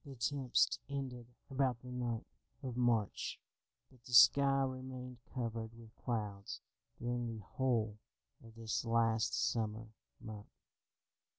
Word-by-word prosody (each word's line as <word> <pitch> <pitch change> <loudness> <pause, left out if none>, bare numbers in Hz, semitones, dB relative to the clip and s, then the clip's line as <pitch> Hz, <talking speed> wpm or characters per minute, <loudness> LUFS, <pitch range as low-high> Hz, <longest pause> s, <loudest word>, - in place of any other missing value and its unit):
The 140 -3 -9
tempest 130 +1 +2
ended 130 -4 -4 0.2
about 130 -3 +1
the 125 - -8
9th 120 -2 -2 0.4
of 125 -3 -3
March, 120 -5 +1 0.5
but 125 -2 -21
the 125 - -9
sky 135 +4 +8
remained 130 -1 -5
covered 115 -2 -3
with 115 -1 -14
clouds 105 -5 -3 0.4
during 120 0 -1
the 105 - -9
whole 115 -3 0 0.4
of 115 -1 -13
this 115 -1 -1
last 115 -1 +2
summer 110 -1 0 0.3
month. 110 -4 -8
120 Hz, 120 wpm, -36 LUFS, 110-130 Hz, 0.5 s, sky